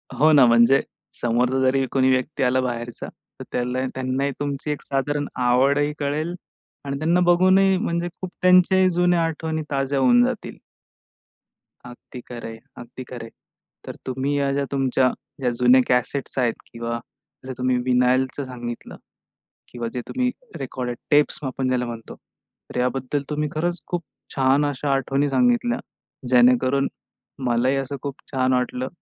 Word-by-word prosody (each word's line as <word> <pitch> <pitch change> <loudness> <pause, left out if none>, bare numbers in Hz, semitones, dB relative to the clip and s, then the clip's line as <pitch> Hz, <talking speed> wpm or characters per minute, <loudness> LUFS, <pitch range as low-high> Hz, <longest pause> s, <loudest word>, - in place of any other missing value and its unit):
हो 155 +2 +4
ना, 140 -4 +7
म्हणजे 120 +3 +5 0.4
समोरचा 125 +2 +1
जरी 130 +1 +2
कोणी 130 -1 +3
व्यक्ती 130 +2 0
आला 130 +1 +2
बाहेरचा, 120 -1 -4 0.3
तर - - -6
त्याला 125 +1 -1 0.2
त्यांनाही 130 +2 -1
तुमची, 145 +1 -3
एक 145 - -4
साधारण 145 +1 -1 0.2
आवडही 140 +4 +3
कळेल 150 +4 -2 0.5
आणि 140 0 -3
त्यांना 170 +3 +2
बघूनही 185 +2 +4
म्हणजे 175 -4 -1
खूप 185 - -4
त्यांच्याही 185 +1 +5
जुन्या 175 -1 +2
आठवणी 160 0 -3
ताज्या 135 0 0
होऊन 120 -2 +5
जातील. - - -4 1.3
अगदी 125 0 -11
खरंय, 115 -2 -8 0.2
अगदी 120 +2 -9
खरंय. 120 -2 -8 0.6
तर - - -7
तुम्ही 135 +3 -1
ह्या 140 -1 +1
ज्या 140 0 0
तुमच्या 130 -1 +2 0.3
ज्या, 125 -2 +1
जुने 125 +2 +5
कॅसेट्स 125 +3 0
आहेत 120 -2 +2 0.2
किंवा 115 0 -4 0.5
जसं 130 - -5
तुम्ही 125 0 +1
विनायलच 130 +1 +2
सांगितलं 120 -2 -7 0.7
किंवा 120 -1 -5
जे 125 - -2
तुम्ही 255 -1 0 0.3
रेकॉर्डेड 125 -2 -4
टेप्स 145 0 +3
आपण 130 0 -2
ज्याला 125 -1 0
म्हणतो, 115 -1 -8
तर - - -13
याबद्दल 130 +2 -1
तुम्ही 150 0 -1
खरंच 175 +3 -2
खूप 175 -1 -3 0.3
छान 135 +2 +3
अशा 145 0 -2
आठवणी 135 +2 0
सांगितल्या, 240 - +2 0.5
जेणेकरून 130 +2 +4 0.6
मलाही 125 +3 +2
असं 135 +1 -3
खूप 140 -2 -4 0.2
छान 130 -1 +1
वाटलं 125 0 -1
135 Hz, 145 wpm, -23 LUFS, 125-145 Hz, 1.3 s, ना